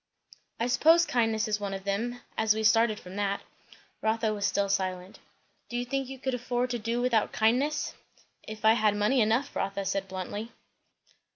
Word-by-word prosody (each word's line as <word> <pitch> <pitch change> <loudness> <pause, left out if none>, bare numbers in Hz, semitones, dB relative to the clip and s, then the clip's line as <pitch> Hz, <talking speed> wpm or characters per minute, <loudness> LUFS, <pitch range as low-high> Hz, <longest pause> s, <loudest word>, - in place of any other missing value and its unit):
"I 230 - +1
suppose 325 +7 +5
kindness 225 -5 +1
is 210 -1 0
one 200 -1 -3
of 195 - -7
them, 230 +5 -2
as 220 -1 +2
we 220 - -2
started 220 0 +4
from 185 +2 -10
that." 200 -1 -1 0.6
Rotha 220 0 +1
was 200 -1 0
still 200 0 0
silent. 185 -1 -2 0.5
"Do 240 - -3
you 245 - -2
think 270 +1 -2
you 270 - -7
could 265 0 -3
afford 245 0 -1
to 240 - -2
do 230 +2 -2
without 235 -4 +2
kindness?" 260 +8 +1 0.5
"If 215 0 -8
I 220 - +7
had 215 -2 +2
money 210 +5 +2
enough," 225 +6 +1
Rotha 195 0 -2
said 195 0 -1
bluntly. 195 +4 -5
220 Hz, 180 wpm, -28 LUFS, 200-245 Hz, 0.6 s, I